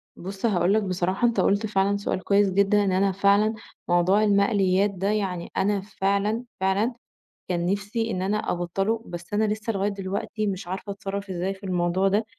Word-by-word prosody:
بُص 190 +4 -6
هأقول 185 -3 +2
لَك 215 0 +2
بصراحة، 185 +4 0
أنت 235 - 0
قُلت 205 +2 +2
فعلًا 200 -1 +1
سؤال 200 -2 -3
كويس 200 +1 +3
جدًا، 200 +1 +3
إن 195 - +1
أنا 195 +1 +2
فعلًا 200 +3 +3 0.3
موضوع 180 +4 +3
المقليات 200 -1 +3
ده، 195 0 -3
يعني 190 -5 -2
أنا 200 0 +1
فعلًا، 200 +3 -1 0.2
فعلًا 195 +6 +1 0.6
كان 175 -1 0
نفسي 205 +4 -1
إن 185 -2 -2
أنا 205 +3 -1
أبطله، 195 +6 -1
بس 175 +3 -8
أنا 210 +1 +2
لسّة 215 +1 -2
لغاية 200 +1 0
دلوقتي 200 +2 -3
مش 190 -3 -4
عارفة 190 +3 -5
أتصرف 200 0 -5
إزاي 185 +1 -2
في 195 +1 -17
الموضوع 180 +1 +1
ده. 205 +3 +1
200 Hz, 180 wpm, -25 LUFS, 185-210 Hz, 0.6 s, كويس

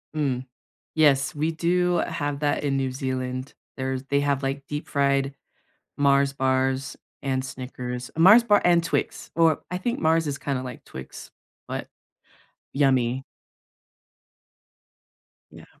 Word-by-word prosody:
Mm. 130 -4 -1 0.5
Yes, 145 0 +3
we 155 +2 0
do 175 +2 +1
have 145 0 -3
that 145 0 0
in 135 -1 +1
New 135 -1 -1
Zealand. 130 0 -3 0.2
There's 130 0 -2
they 140 +1 +1
have, 140 -1 0
like, 135 +1 -2
deep-fried 140 -2 0 0.6
Mars 140 -1 +3
bars 130 0 0 0.3
and 130 -1 -1
Snickers. 125 -1 -6
Mars 210 +8 +8
bar 205 -3 +4
and 170 -1 +4
Twix. 165 - -2
Or 165 -2 +3
I 180 - -2
think 235 +6 -2
Mars 160 0 +3
is 140 0 -2
kinda 135 -2 -2
like 125 -2 -8
Twix, 65 0 -9 0.4
but - - -4 0.9
yummy. 130 -2 +2 2.3
Yeah. - - -13
140 Hz, 125 wpm, -25 LUFS, 130-155 Hz, 2.3 s, Mars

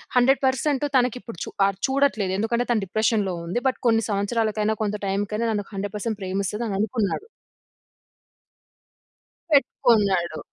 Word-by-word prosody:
100% 265 +2 +2
తనకిప్పుడు 250 -5 0
చూ - - -7 0.2
ఆహ్, 195 -1 0
చూడట్లేదు. 265 -9 +1
ఎందుకంటే 235 +3 0
తను 215 -4 +1
డిప్రెషన్‌లో 210 -1 +1
ఉంది. 200 +9 -2
బట్ - - -5
కొన్ని 225 -1 +3
సంవత్సరాలకైనా, 215 +1 0
కొంత 210 0 -1
టైంకైనా 205 +4 -1
నన్ను 205 -2 -2
100% 205 +2 -3
ప్రేమిస్తదననుకున్నాడు. 205 - -2 2.3
పెట్టుకున్నాడు. 200 - +2
215 Hz, 105 wpm, -24 LUFS, 200-240 Hz, 2.3 s, కొన్ని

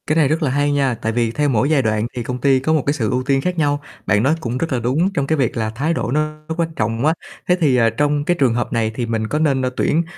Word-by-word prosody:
Cái 155 - +1
này 160 -3 +4
rất 155 +3 0
là 145 - +1
hay 145 +2 +1
nha, 135 -4 +1
tại 115 0 -3
vì 115 0 0
theo 145 +4 0
mỗi 120 +2 +1
giai 155 -3 +3
đoạn 110 -1 0
thì 120 - -3
công 125 +1 -5
ty 135 -1 +4
có 155 +5 0
một 155 -4 +1
cái 145 - +2
sự 115 -7 -1
ưu 130 0 0
tiên 135 +1 +1
khác 180 +4 -2
nhau. 145 -2 +1 0.2
Bạn 105 +3 +2
nói 145 +5 +3
cũng 120 -4 -3
rất 160 +1 -2
là 125 - 0
đúng 150 - 0
trong 140 -5 -1
cái 160 - +1
việc 130 -5 0
là 110 -1 -1
thái 140 +9 -1
độ 165 - -2
nó 155 +1 -1
nó 160 - -2
quan 165 -1 -2
trọng 115 +3 -1
quá. 155 - +4 0.3
Thế 180 - +4
thì, 140 -5 +3
ờ, 115 -2 +4
trong 145 +5 0
cái 175 - +2
trường 130 -4 +3
hợp 120 +1 -2
này 115 -2 0
thì 120 - -2
mình 110 -1 -2
có 150 - -1
nên, 140 -4 +2
ơ, 130 - 0
tuyển 165 +3 +2
135 Hz, 320 wpm, -19 LUFS, 115-155 Hz, 0.3 s, này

